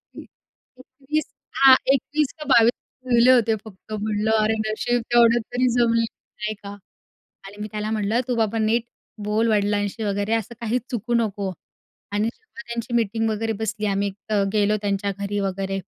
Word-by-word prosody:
एक - - -8 0.6
21 280 +4 -4 0.4
हां, 265 -1 +10 0.2
21 290 +2 0
का 300 - -6
22 230 0 +6 0.4
जुळले 240 +1 +6
होते 230 -3 +4
फक्त. 215 +1 -11
म्हणलं 215 +1 -1
अरे, 220 - +2 0.2
नशीब 240 +3 0
तेवढं 235 0 +6
तरी 255 +1 +2
जमलं, 230 -1 +3 0.4
नाही 210 0 -1
का? 200 - -7 0.8
आणि 200 +1 -11
मी 210 - -3
त्याला 215 0 -3
म्हटलं 220 +2 +1
तू 250 - 0
बाबा 225 -1 0
नीट 225 +2 +2 0.4
बोल 215 +2 +1
वडिलांशी 205 +1 0
वगैरे 205 +1 -1
असं 225 +1 -2
काही 235 +2 0
चुकू 240 0 -2
नको 205 -4 0 0.6
आणि 210 +2 +1
जेव्हा 440 - -13
त्यांची 235 0 -4
मीटिंग 225 -1 +1
वगैरे 225 +1 -1
बसली 220 -1 -2
आम्ही 200 0 0
एक 195 - -5 0.2
तर 205 -2 +2
गेलो 210 0 +3
त्यांच्या 200 0 -1
घरी 200 0 -2
वगैरे 195 0 -2
220 Hz, 165 wpm, -23 LUFS, 205-235 Hz, 0.8 s, हां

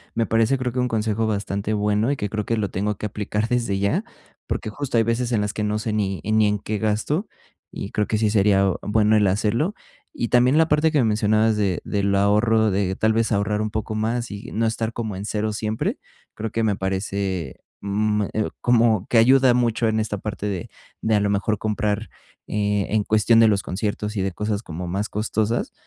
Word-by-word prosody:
Me 115 0 +1
parece, 115 +4 +2
creo, 125 -2 -3
que 130 - -2
un 125 - +1
consejo 110 -1 0
bastante 100 0 -2
bueno 105 +4 +1
y 145 - -1
que 105 - -3
creo 105 -1 -2
que 115 - 0
lo 105 -2 -1
tengo 105 +3 -1
que - - -5
aplicar 105 +1 -2
desde 120 -5 0
ya, 100 - 0 0.4
porque 110 - -3
justo 135 -3 -2
hay 115 - +4
veces 115 +2 -1
en 110 -3 +2
las 105 0 -2
que 105 - -3
no 105 0 0
sé 110 0 -3
ni 100 -3 -1
en 110 +1 +1
ni 105 - +4
en 105 - +1
qué 105 +1 -4
gasto 110 - -1 0.4
y 100 - -6
creo 105 - 0
que 110 - 0
sí 105 -1 +1
sería 100 -2 +3
bueno 105 +1 +2
el 105 -2 +4
hacerlo. 110 - 0 0.4
Y 120 - -3
también 125 +4 +4
la 160 0 +4
parte 150 +1 +3
que 155 - +1
me 130 - +4
mencionabas 110 0 +2
de 100 -4 0
del 100 -1 0
ahorro, 105 +2 +3
de 95 -1 0
tal 110 +2 +2
vez 115 +1 +1
ahorrar 105 0 0
un 110 - -1
poco 110 +1 -4
más 115 +2 -2
y 100 +4 -8
no 115 +1 0
estar 115 0 -1
como 110 -4 -4
en 100 +2 -5
0 110 0 -2
siempre, 110 +1 -2 0.3
creo 110 +1 -4
que 115 - -1
me 105 -2 +1
parece, 95 -2 -3 0.2
mm, 105 +1 0 0.4
como 115 -4 +3
que 120 - +2
ayuda 130 +2 +6
mucho 120 -2 +1
en 110 0 +1
esta 110 -1 -3
parte 105 0 -5
de 95 -4 -4 0.3
de, 110 -1 +2
a - - +3
lo 100 0 +1
mejor, 100 +2 0
comprar 105 0 -2 0.4
e 105 -1 0
en 105 - +2
cuestión 110 +2 +3
de 115 - +7
los 100 -2 +2
conciertos 105 +2 -3
y 95 - +1
de 95 - -1
cosas 105 +3 -2
como 85 0 -6
más 100 +4 -2
costosas. 110 +2 -1
110 Hz, 220 wpm, -23 LUFS, 105-115 Hz, 0.4 s, de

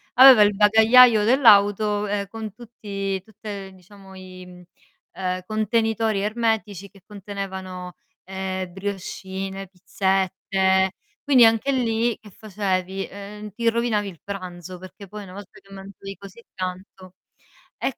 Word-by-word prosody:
aveva 255 -3 +9
il 205 -1 +4
bagagliaio 220 +2 +6
dell'auto, 210 -3 +4
ehm, 200 0 -2
con 220 +1 -7
tutti 200 -4 -5
tutte, 205 -2 -9
ehm, 190 - -15
diciamo 190 +1 -16
i, 185 -1 -11
mhmm, 180 0 -14 0.5
ehm, 185 -1 -3
contenitori 220 0 0
ermetici 215 -3 -2
che 195 +1 -20
contenevano, 190 -3 -7 0.3
ehm, 190 -1 -5
briochine, 195 0 -6
pizzette, 190 0 0 0.3
quindi 260 -4 +6
anche 225 +4 +2
lì 235 -3 0
che 210 - -15
facevi: 195 -2 -3
ehm, 210 +1 -9
ti 230 +3 0
rovinavi 230 -3 -1
il 170 -4 -14
pranzo 185 -2 -8
perché 185 +2 -12
poi 210 +2 -9
una 185 -2 -12
volta 200 -1 -12
che 195 - -22
mangiavi 195 0 -10
così 200 +3 -13
tanto 185 0 -7 0.7
e 270 - -1
200 Hz, 130 wpm, -23 LUFS, 190-215 Hz, 0.7 s, aveva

